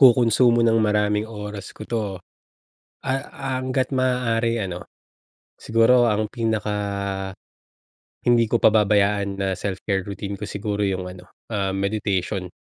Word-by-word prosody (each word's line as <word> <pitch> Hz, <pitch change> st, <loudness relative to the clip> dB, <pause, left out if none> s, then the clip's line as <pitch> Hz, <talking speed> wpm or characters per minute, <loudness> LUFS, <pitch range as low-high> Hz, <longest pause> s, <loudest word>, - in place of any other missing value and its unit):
kukunsumo 120 Hz, -2 st, +5 dB
ng 115 Hz, -1 st, +4 dB
maraming 105 Hz, 0 st, +1 dB
oras 105 Hz, -2 st, -7 dB
ko -, -, -7 dB
'to, 110 Hz, -4 st, -2 dB, 0.8 s
ah, 135 Hz, 0 st, -2 dB, 0.3 s
hangga't 130 Hz, 0 st, -1 dB
maaari 115 Hz, -3 st, +1 dB
ano, 90 Hz, -3 st, -4 dB, 0.8 s
siguro 115 Hz, +2 st, +4 dB
ang 105 Hz, -1 st, 0 dB
pinaka, 110 Hz, -3 st, -1 dB, 1.5 s
hindi 120 Hz, -2 st, +4 dB
ko 120 Hz, -, +3 dB
pababayaan 100 Hz, -2 st, +3 dB
na 95 Hz, -1 st, 0 dB
self 95 Hz, 0 st, -4 dB
care 95 Hz, -2 st, +1 dB
routine 100 Hz, +1 st, -5 dB
ko, 100 Hz, -, -10 dB
siguro 105 Hz, 0 st, -3 dB
yung 95 Hz, -2 st, -1 dB
ano, 90 Hz, 0 st, -11 dB, 0.2 s
ah, 100 Hz, -2 st, 0 dB
meditation 95 Hz, -2 st, -1 dB
105 Hz, 125 wpm, -23 LUFS, 100-115 Hz, 1.5 s, kukunsumo